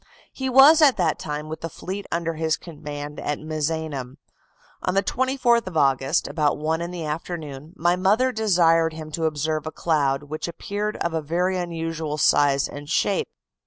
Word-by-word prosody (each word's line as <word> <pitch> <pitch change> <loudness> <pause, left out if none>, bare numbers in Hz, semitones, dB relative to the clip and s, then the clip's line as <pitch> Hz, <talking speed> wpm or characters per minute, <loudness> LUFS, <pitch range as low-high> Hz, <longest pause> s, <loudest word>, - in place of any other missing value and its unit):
"He 265 -1 -3
was 275 +5 +8
at 280 -4 +6
that 170 -5 +1
time 150 0 -4
with 160 +1 -7
the 165 - -4
fleet 195 +5 -6
under 165 0 -1
his 160 0 0
command 150 -2 -8
at 145 - -2
Misenum. 155 -4 -3 0.6
On 185 - -1
the 195 - +3
24th 245 -1 +1
of 180 -3 -4
August, 135 -2 +2
about 150 0 0
one 160 +2 -1
in 170 - -3
the 175 -3 -5
afternoon, 155 -1 -6
my 175 -1 +2
mother 210 +8 +2
desired 170 -7 +3
him 155 -1 -8
to 165 +1 -2
observe 155 0 -1
a - - -3
cloud 145 -5 0
which 155 +3 -5
appeared 205 +5 -4
of 170 - -2
a 160 - 0
very 175 +5 0
unusual 165 -3 -3
size 140 -2 +3
and 145 0 -9
shape. 195 +4 +1
160 Hz, 175 wpm, -24 LUFS, 150-185 Hz, 0.6 s, was